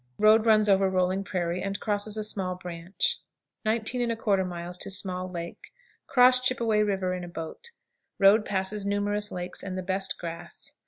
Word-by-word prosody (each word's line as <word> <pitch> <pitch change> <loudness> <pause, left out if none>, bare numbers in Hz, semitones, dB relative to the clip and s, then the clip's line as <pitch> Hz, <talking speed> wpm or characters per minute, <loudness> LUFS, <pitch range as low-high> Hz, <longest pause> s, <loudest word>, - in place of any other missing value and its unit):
Road 215 +1 +5
runs 215 -1 +5
over 195 -1 +4
rolling 185 +1 +1
prairie, 180 -2 -2
and 195 +1 -3
crosses 210 0 -1
a 215 - -2
small 190 -4 -2
branch. 175 +1 -2 0.5
19 235 +2 0
1/4. 185 -5 -1
Small 185 -1 -2
Lake. 170 -1 -8 0.4
Cross 255 -1 +6
Chippeway 235 -4 +1
River 195 -3 0
in 180 -1 -4
a - - -6
boat. 165 - -8 0.5
Road 200 +2 +6
passes 200 0 -1
numerous 205 +1 -1
lakes 180 0 -3
and 185 -1 -5
the 185 - -3
best 190 +1 0
grass. 170 -1 -8
195 Hz, 155 wpm, -27 LUFS, 180-215 Hz, 0.5 s, Cross